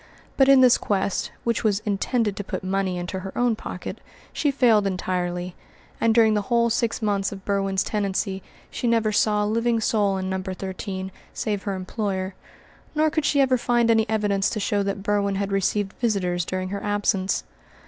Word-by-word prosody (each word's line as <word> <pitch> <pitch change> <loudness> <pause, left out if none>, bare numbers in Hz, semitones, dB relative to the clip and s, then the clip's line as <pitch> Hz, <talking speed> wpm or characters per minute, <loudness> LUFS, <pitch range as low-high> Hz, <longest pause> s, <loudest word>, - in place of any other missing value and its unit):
But 270 -1 +4
in 270 -1 +8
this 250 -2 +6
quest, 200 -1 -1
which 235 0 0
was 210 -3 +2
intended 210 +1 0
to 205 - -4
put 190 - -5
money 190 -1 -1
into 175 +2 -4
her 190 +1 -8
own 245 -2 +2
pocket, - - -7 0.3
she 295 - +1
failed 235 -7 +4
entirely; 180 -1 -2 0.5
and 230 - +4
during 225 -2 +5
the 210 - +1
whole 235 +2 +1
six 235 -1 0
months 200 -2 0
of 195 -1 -9
Berwin's 195 -1 0
tenancy 195 -1 -2 0.3
she 245 - -2
never 225 -2 +2
saw 210 0 +2
a - - 0
living 230 +2 +1
soul 205 -3 +1
in 190 0 -3
No. 190 0 -2
13 190 0 -5 0.2
save 205 -2 -2
her 200 -2 -1
employer; 190 0 -3 0.6
nor 310 0 +3
could 315 -2 0
she 280 -1 +3
ever 260 -2 +3
find 240 -1 +2
any 220 -1 +2
evidence 205 -3 +1
to 215 - -3
show 205 0 0
that 200 0 -3
Berwin 200 -1 +1
had 200 0 -2
received 195 +1 0
visitors 180 -7 0
during 185 0 -3
her 200 +1 -4
absence. 205 -2 0
205 Hz, 185 wpm, -24 LUFS, 190-230 Hz, 0.6 s, in